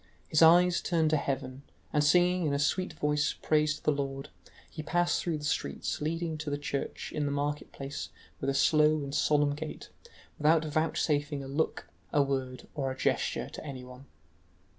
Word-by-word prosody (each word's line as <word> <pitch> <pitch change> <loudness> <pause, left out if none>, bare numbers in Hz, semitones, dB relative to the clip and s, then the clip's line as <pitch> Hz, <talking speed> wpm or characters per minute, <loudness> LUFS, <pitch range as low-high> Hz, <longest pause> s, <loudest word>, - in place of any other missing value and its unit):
His 155 - +3
eyes 175 +2 +6
turned 160 -3 +1
to 155 - +4
heaven, 135 -1 -3 0.3
and 150 -1 +3
singing 180 +2 +4
in 140 - +1
a - - +1
sweet 165 +5 0
voice 150 -1 0
praise 150 0 +2
to - - -14
the - - +3
Lord, 135 -1 -3 0.4
he 155 - -7
passed 175 +2 +1
through 165 -3 -1
the 150 - -9
streets 150 - -2
leading 160 +1 -2
to 150 -1 -4
the 145 - -1
church 140 -1 -4
in 150 -1 -1
the - - -1
market 145 +1 -2
place 135 +1 -6 0.3
with 135 - -1
a 135 - 0
slow 150 +1 +4
and 140 0 -6
solemn 145 -1 +3
gait, 155 +1 -7 0.5
without 155 +1 +4
vouchsafing 150 -2 0
a - - -7
look, 145 +4 -2 0.2
a 145 - +4
word, 130 -2 -3
or 135 -3 -2
a 130 - -5
gesture - - 0
to - - -9
anyone. 130 -2 -9
150 Hz, 185 wpm, -30 LUFS, 140-160 Hz, 0.5 s, eyes